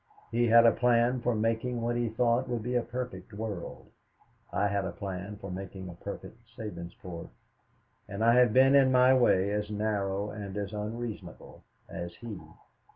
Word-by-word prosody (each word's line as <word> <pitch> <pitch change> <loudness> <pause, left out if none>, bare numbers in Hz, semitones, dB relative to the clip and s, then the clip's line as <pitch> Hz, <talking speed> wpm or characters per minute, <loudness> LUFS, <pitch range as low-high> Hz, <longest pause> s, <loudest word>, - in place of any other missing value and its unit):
He 120 +1 +2
had 115 +1 +7
a 115 - +8
plan 120 +1 +2
for 120 -1 +1
making 115 +3 0
what 120 +1 -1
he 120 -1 0
thought 120 +3 +1
would 120 -3 -2
be 125 +2 -2
a 120 - +3
perfect 125 -1 -6
world; 105 -4 -6 0.6
I - - +1
had 100 -1 0
a 95 - -3
plan 100 +1 -6
for 100 -2 -8
making 95 0 -7
a - - -8
perfect 100 +5 -8 0.2
Sabinsport. 85 -4 -7 0.8
And 105 +3 -1
I 115 - +6
have 125 -2 +5
been 130 +4 +6
in 135 -2 +6
my 130 0 +6
way 100 -6 +3
as 105 0 -2
narrow 105 -1 -1
and 105 -2 -6
as 100 0 -4
unreasonable 110 +2 -6 0.2
as 85 0 -6
he. 115 0 -7
110 Hz, 170 wpm, -29 LUFS, 100-120 Hz, 0.8 s, a